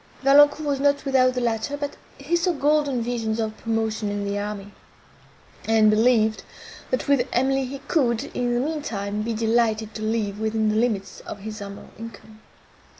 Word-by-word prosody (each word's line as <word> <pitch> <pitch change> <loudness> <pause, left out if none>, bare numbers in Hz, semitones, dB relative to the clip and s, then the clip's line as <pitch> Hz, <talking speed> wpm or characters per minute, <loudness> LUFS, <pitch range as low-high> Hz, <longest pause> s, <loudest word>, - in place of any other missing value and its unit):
Valancourt 290 +2 +6
was 280 -2 0
not 285 +1 +2
without 255 -2 +3
the 250 - -1
latter, 235 +4 -1
but 285 0 -4 0.2
he 285 +5 -1
saw 345 +1 +1
golden 290 -4 +1
visions 225 -2 -2
of 220 -1 -2
promotion 220 -2 -1
in 205 0 -3
the 200 0 -2
army; 205 -1 -5 0.9
and 220 -1 +4
believed, 220 0 +3 0.5
that 255 - -1
with 275 -3 +3
Emily 265 +2 +1
he 270 +2 -6
could, 240 -8 +1
in 245 -1 0
the - - +1
mean 300 +4 -2
time, 205 -4 -3
be 225 +1 -2
delighted 220 -1 +1
to 215 - -7
live 215 -2 -1
within 220 0 0
the 215 - 0
limits 220 -4 -1
of 200 - -9
his 215 +1 -6
humble 200 0 -9
income. 220 -1 -11
230 Hz, 175 wpm, -24 LUFS, 215-270 Hz, 0.9 s, Valancourt